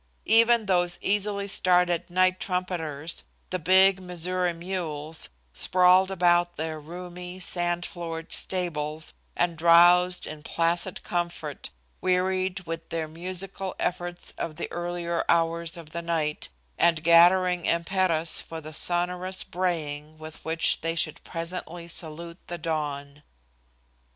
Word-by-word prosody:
Even 230 0 +5
those 175 -2 +2
easily 200 0 0
started 180 -2 +2
night 185 +1 +2
trumpeters, 170 -5 -3 0.3
the 185 - -1
big 190 +3 +5
Missouri 180 0 -1
mules, 165 -3 -4 0.2
sprawled 185 - +4
about 175 -2 +2
their 160 0 -3
roomy, 180 +3 -8
sand 175 -1 -1
floored 165 -3 -6
stables 155 -4 0 0.2
and 175 -1 +1
drowsed 175 +2 +5
in 155 -1 -8
placid 170 +4 0
comfort, 170 -4 -3 0.3
wearied 185 +1 0
with 165 -1 -6
their 165 -1 -2
musical 185 +3 -5
efforts 175 0 -3
of 155 - -3
the 170 - -5
earlier 175 -1 -2
hours 170 0 +1
of 160 -2 -11
the 170 - -4
night 160 -3 -2 0.3
and 165 -2 +3
gathering 175 +2 +5
impetus 170 -1 +1
for 165 - -8
the 155 0 -9
sonorous 180 +3 +1
braying 155 -4 -3
with 155 0 -11
which 160 0 +1
they 165 +1 -2
should 155 -2 -1
presently 170 0 -6
salute 170 +1 -3
the 175 - -4
dawn. 145 -3 -4
175 Hz, 120 wpm, -26 LUFS, 165-180 Hz, 0.3 s, Even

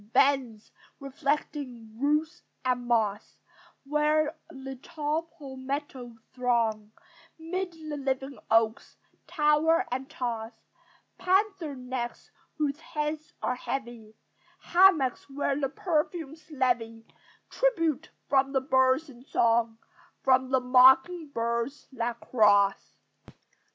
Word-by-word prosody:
Bends, 260 -6 +2 0.3
reflecting 275 -5 -3
root 305 +4 0 0.2
and 250 -1 0
moss, 215 -4 0 0.5
Where 300 +2 +1
the 270 0 -8
tall 305 +2 -3 0.2
palmettos 265 -3 -6 0.2
throng 230 -4 0 0.5
'Mid 350 +3 -4
the 310 -2 -7
live 270 -1 -1 0.3
oaks; 225 0 +1 0.3
tower 315 +3 +3
and 260 +2 -3
toss 235 -5 -4 0.7
Panther 375 -5 +1
necks 250 -1 -6 0.3
whose 295 -1 -1
heads 310 -1 -4
are - - +1
heavy: 240 -4 -6 0.6
Hamaks, 345 -9 +4
where 275 0 -1
the 275 -1 -1
perfumes 315 -1 -3
levy 240 -5 -1 0.5
Tribute 330 - 0 0.2
from 275 0 +2
the 265 - +2
birds 260 +2 +2
in 250 -3 -14
song, 230 -3 +1 0.5
From 260 -1 +3
the 260 0 +3
mocking 265 +7 +5
birds 235 +1 -3
that 235 -2 -3
cross. 205 -3 +3
270 Hz, 100 wpm, -28 LUFS, 240-305 Hz, 0.7 s, mocking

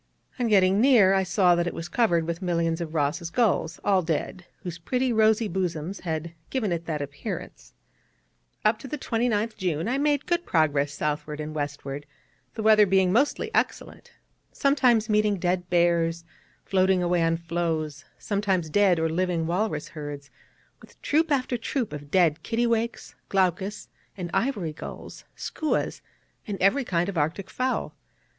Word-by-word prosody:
On 245 - +1
getting 195 -1 +4
near 230 -8 +6
I 195 - +3
saw 185 -1 +3
that 175 0 +1
it - - -4
was 165 - -5
covered 175 -5 +2
with 170 +2 -4
millions 170 -2 0
of 165 -1 -5
Ross's 160 +3 0
gulls, 185 -6 +1
all 195 -2 +3
dead, 175 +2 -3 0.2
whose 170 -3 -6
pretty 250 +8 0
rosy 220 0 +3
bosoms 180 -1 -3
had 165 -1 -4 0.2
given 230 -8 -1
it 170 -1 -2
that 150 -3 -2
appearance. 145 +10 -7 0.9
Up 215 +1 +3
to - - -9
the 300 - -4
29th 230 -3 -1
June 170 -4 -1
I 260 +3 0
made 290 -1 +1
good 345 -1 0
progress 145 - +1
southward 150 0 -3
and 155 0 -5
westward 145 -1 -5 0.5
(the 220 - -4
weather 215 -1 +6
being 190 -1 +3
mostly 270 +8 +1
excellent), - - -2 0.4
sometimes 250 -6 +3
meeting 210 -2 +2
dead 180 0 -1
bears, 170 -1 +2 0.4
floating 190 -1 +2
away 175 0 +1
on 165 0 +2
floes, 165 -3 -2
sometimes 195 -6 -1
dead 195 -1 +4
or 160 0 +1
living 170 0 0
walrus 175 -2 -1
herds, 145 -3 -8 0.5
with - - -18
troop 315 +2 +2
after 255 -3 0
troop 235 - -2
of 145 -1 -8
dead 165 -2 +3
kittiwakes, 235 +1 -1 0.2
glaucus 195 +2 0 0.3
and 175 -2 -5
ivory 205 - 0
gulls, - - -9
skuas, 310 - -2 0.5
and 200 -3 -4
every 200 +9 +3
kind 175 -5 0
of 190 -5 -2
Arctic 160 +6 -2
fowl. 255 0 -1
180 Hz, 155 wpm, -26 LUFS, 165-215 Hz, 0.9 s, near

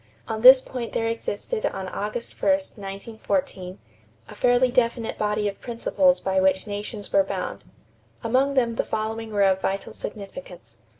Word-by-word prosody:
On 220 0 -3
this 255 +2 +10
point 245 -3 -6
there 225 - 0
existed 230 - -3
on 190 - -2
August 210 +5 -4
1, - - +2
1914, 195 -7 -3 0.5
a - - -9
fairly 245 0 +3
definite 235 -2 +1
body 210 0 0
of 200 - -5
principles 270 +3 +2
by 190 0 0
which 190 0 +2
nations 205 0 -6
were 295 - +6
bound. - - -5 0.6
Among 260 +4 +2
them 235 -3 +1
the - - +2
following 220 +1 -3
were 205 -1 +2
of 190 -1 +3
vital 195 +1 -2
significance. 190 - -9
220 Hz, 155 wpm, -24 LUFS, 195-245 Hz, 0.6 s, this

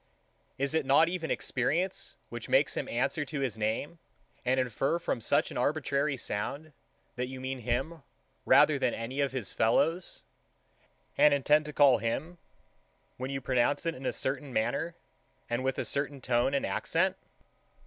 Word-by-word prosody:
Is 140 +2 0
it 160 -1 +2
not 140 +5 +4
even 175 -3 -3
experience, 170 +9 -1
which - - -7
makes - - +3
him - - -3
answer 155 - 0
to 145 +1 -5
his 130 -4 -1
name, 110 +10 -2 0.4
and 130 +1 +2
infer, 130 +5 0
from 150 -8 -2
such - - +2
an - - -3
arbitrary 140 0 0
sound, 140 +8 -3 0.4
that 125 0 -1
you 130 0 -7
mean 130 0 -4
him 130 +8 -2 0.4
rather - - +5
than - - +1
any 125 +5 -3
of 140 -3 +1
his 130 -6 -4
fellows, 165 +10 +1 1.0
and 150 -1 +7
intend 150 +2 +3
to 150 - -5
call 140 -5 +5
him, 155 +10 -3 0.8
when 130 +1 -4
you 135 0 -3
pronounce 130 +5 +1
it 165 - 0
in 130 -2 -6
a - - +1
certain 135 +1 -3
manner, 140 +9 -1 0.5
and 120 +2 -2
with 130 0 -1
a - - -2
certain 140 0 -1
tone 125 +2 +1
and 140 - 0
accent? - - 0
135 Hz, 165 wpm, -30 LUFS, 125-150 Hz, 1.0 s, and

